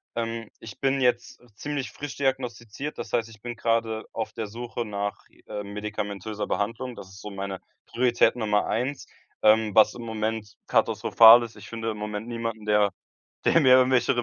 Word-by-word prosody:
Ähm, 115 Hz, -1 st, -3 dB
ich 110 Hz, -3 st, -11 dB
bin 135 Hz, 0 st, +1 dB
jetzt 120 Hz, -1 st, 0 dB
ziemlich 145 Hz, +3 st, -4 dB
frisch 145 Hz, -1 st, -7 dB
diagnostiziert. 130 Hz, 0 st, -3 dB
Das -, -, -6 dB
heißt, 115 Hz, -2 st, +1 dB
ich 110 Hz, -2 st, -16 dB
bin 120 Hz, +1 st, -5 dB
grade 115 Hz, -1 st, 0 dB
auf 110 Hz, -1 st, -3 dB
der 110 Hz, -2 st, -4 dB
Suche 120 Hz, +2 st, -5 dB
nach, 100 Hz, -1 st, -4 dB, 0.2 s
ähm, 105 Hz, -1 st, -6 dB
medikamentöser 105 Hz, 0 st, -4 dB
Behandlung. 115 Hz, +4 st, -2 dB
Das 95 Hz, -, -10 dB
ist 95 Hz, -, -13 dB
so 105 Hz, -, -7 dB
meine 100 Hz, -1 st, -5 dB, 0.3 s
Priorität 120 Hz, 0 st, +2 dB
Nummer 105 Hz, -2 st, +1 dB
1. 130 Hz, +5 st, -2 dB, 0.4 s
Ähm, 110 Hz, -1 st, +4 dB
was 110 Hz, -1 st, +6 dB
im 120 Hz, -, -8 dB
Moment 110 Hz, -1 st, -3 dB
katastrophal 115 Hz, +1 st, +6 dB
ist: 115 Hz, -, -9 dB
Ich -, -, -11 dB
finde 115 Hz, -1 st, -3 dB
im 105 Hz, -, -7 dB
Moment 105 Hz, +1 st, -5 dB
niemanden, 115 Hz, -2 st, -4 dB
der 105 Hz, -1 st, +3 dB, 0.5 s
der 165 Hz, -, +5 dB
mir 130 Hz, -3 st, +7 dB
irgendwelche 130 Hz, -1 st, +3 dB
115 Hz, 175 wpm, -26 LUFS, 105-120 Hz, 0.5 s, mir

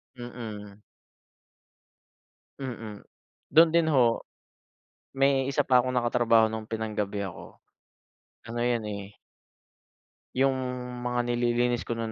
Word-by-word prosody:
Mm. 110 Hz, -4 st, -8 dB, 1.8 s
Mm, 115 Hz, -6 st, -7 dB, 0.5 s
dun 165 Hz, +1 st, +8 dB
din 170 Hz, 0 st, +3 dB
ho, 120 Hz, -4 st, +3 dB, 0.9 s
may 135 Hz, -1 st, +3 dB
isa 140 Hz, 0 st, +1 dB
pa 125 Hz, -2 st, +5 dB
akong 130 Hz, -, -2 dB
nakatrabaho 120 Hz, -2 st, +3 dB
nung 110 Hz, 0 st, -5 dB
pinang-gabi 105 Hz, -2 st, -2 dB
ako. 90 Hz, -, -10 dB, 0.9 s
Ano 120 Hz, +1 st, -4 dB
yun, 120 Hz, -2 st, 0 dB
eh 100 Hz, -1 st, -7 dB, 1.2 s
Yung 135 Hz, +1 st, +3 dB, 0.5 s
mga 125 Hz, 0 st, 0 dB
nililinis 120 Hz, 0 st, 0 dB
ko 120 Hz, -, -1 dB
nun 115 Hz, -1 st, -3 dB
120 Hz, 105 wpm, -27 LUFS, 110-125 Hz, 1.8 s, dun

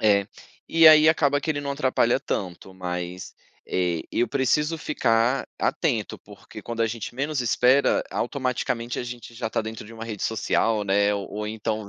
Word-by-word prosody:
É. 100 Hz, -2 st, +3 dB, 0.4 s
E 165 Hz, -1 st, +6 dB
aí 155 Hz, 0 st, +7 dB
acaba 145 Hz, -3 st, +3 dB
que 160 Hz, -, -2 dB
ele 145 Hz, -2 st, -1 dB
não 140 Hz, -, -4 dB
atrapalha 130 Hz, -3 st, +2 dB
tanto, 95 Hz, -5 st, -5 dB
mas, 90 Hz, 0 st, -5 dB, 0.3 s
eh, 90 Hz, -3 st, 0 dB
eu 120 Hz, -, +1 dB
preciso 150 Hz, +5 st, 0 dB
ficar 125 Hz, -4 st, +1 dB
atento, 120 Hz, -, -1 dB
porque 105 Hz, +1 st, -13 dB
quando 115 Hz, +2 st, -5 dB
a 115 Hz, -, +3 dB
gente 115 Hz, +1 st, -5 dB
menos 140 Hz, +2 st, -2 dB
espera, 125 Hz, +3 st, +3 dB
automaticamente 125 Hz, -2 st, -2 dB
a -, -, -2 dB
gente 120 Hz, -1 st, -9 dB
já 115 Hz, -1 st, -4 dB
tá -, -, 0 dB
dentro 110 Hz, 0 st, -7 dB
de 115 Hz, -, -12 dB
uma 115 Hz, 0 st, -8 dB
rede 110 Hz, -3 st, -6 dB
social, 110 Hz, 0 st, +1 dB
né, 100 Hz, +1 st, +2 dB
ou 100 Hz, -1 st, -4 dB
ou 105 Hz, +1 st, -4 dB
então 110 Hz, -1 st, -3 dB
115 Hz, 175 wpm, -24 LUFS, 105-135 Hz, 0.4 s, aí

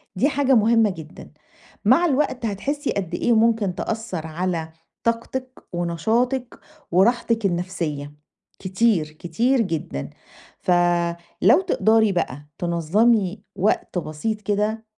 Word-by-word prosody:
دي 255 Hz, +10 st, +2 dB
حاجة 275 Hz, -2 st, +2 dB
مهمة 225 Hz, 0 st, +4 dB
جدًا، 160 Hz, -4 st, -10 dB, 0.5 s
مع 260 Hz, +11 st, +5 dB
الوقت 275 Hz, -5 st, 0 dB
هتحسي 275 Hz, +8 st, -2 dB
قد 180 Hz, -4 st, -3 dB
إيه 240 Hz, -, +2 dB
ممكن 220 Hz, -4 st, +2 dB
تأثَّر 210 Hz, -7 st, -4 dB
على 165 Hz, 0 st, -2 dB, 0.3 s
طاقتِك 255 Hz, +3 st, -2 dB
ونشاطِك، 225 Hz, -, -1 dB, 0.3 s
وراحتِك 230 Hz, +4 st, +2 dB
النَفْسية 170 Hz, -6 st, -2 dB, 0.5 s
كتير 190 Hz, -2 st, +1 dB
كتير 230 Hz, +11 st, 0 dB
جدًا. 160 Hz, -, -3 dB, 0.5 s
ف -, -, -1 dB, 0.7 s
لو 230 Hz, -, +6 dB
تقدري 220 Hz, -1 st, +3 dB
بَقى 145 Hz, -6 st, -2 dB
تنظمي 190 Hz, +4 st, +1 dB
وقت 195 Hz, -1 st, 0 dB
بسيط 175 Hz, +8 st, -4 dB
كده 210 Hz, +2 st, -1 dB
210 Hz, 110 wpm, -23 LUFS, 175-235 Hz, 0.7 s, لو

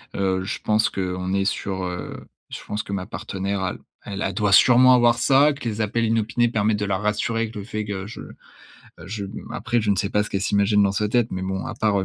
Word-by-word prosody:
Heu, 95 Hz, -1 st, 0 dB
je 95 Hz, -, -4 dB
pense 105 Hz, 0 st, +2 dB
qu'on 90 Hz, 0 st, -3 dB
est 100 Hz, 0 st, +1 dB
sur, 95 Hz, -2 st, -2 dB
heu, 90 Hz, 0 st, -6 dB, 0.2 s
je -, -, -7 dB
pense 105 Hz, 0 st, -3 dB
que 100 Hz, -, -6 dB
ma 95 Hz, -2 st, -3 dB
partenaire 100 Hz, 0 st, -3 dB
elle, 90 Hz, -, -4 dB, 0.2 s
elle 100 Hz, -1 st, -6 dB
elle 95 Hz, -, -5 dB
doit 105 Hz, +1 st, 0 dB
sûrement 125 Hz, +5 st, +7 dB
avoir, 120 Hz, -1 st, +4 dB
ça 140 Hz, +5 st, +4 dB
que 135 Hz, -4 st, -7 dB
les 110 Hz, 0 st, -5 dB
appels 115 Hz, +2 st, 0 dB
inopinés 115 Hz, +1 st, +1 dB
permettent 110 Hz, -2 st, +1 dB
de 105 Hz, -, -1 dB
la 95 Hz, -1 st, 0 dB
rassurer 105 Hz, +2 st, -1 dB
avec 115 Hz, 0 st, -4 dB
le 105 Hz, -, -5 dB
fait 110 Hz, 0 st, -4 dB
que 95 Hz, -2 st, -4 dB
je 115 Hz, -, -9 dB, 0.8 s
je 100 Hz, +1 st, -5 dB
mmh 100 Hz, -, -9 dB
après 120 Hz, +1 st, -1 dB
je 105 Hz, -1 st, 0 dB
ne 100 Hz, -, +2 dB
sais 100 Hz, +1 st, -1 dB
pas 105 Hz, -, +2 dB
ce 105 Hz, -, -7 dB
qu'elle 95 Hz, -, -1 dB
s'imagine 100 Hz, +1 st, +2 dB
dans 100 Hz, -, +2 dB
sa 105 Hz, +1 st, 0 dB
tête, 120 Hz, 0 st, +2 dB
mais 95 Hz, -, -4 dB
bon, 95 Hz, 0 st, -3 dB
à -, -, -5 dB
part 105 Hz, -2 st, +1 dB
heu: -, -, -2 dB
105 Hz, 250 wpm, -23 LUFS, 95-110 Hz, 0.8 s, sûrement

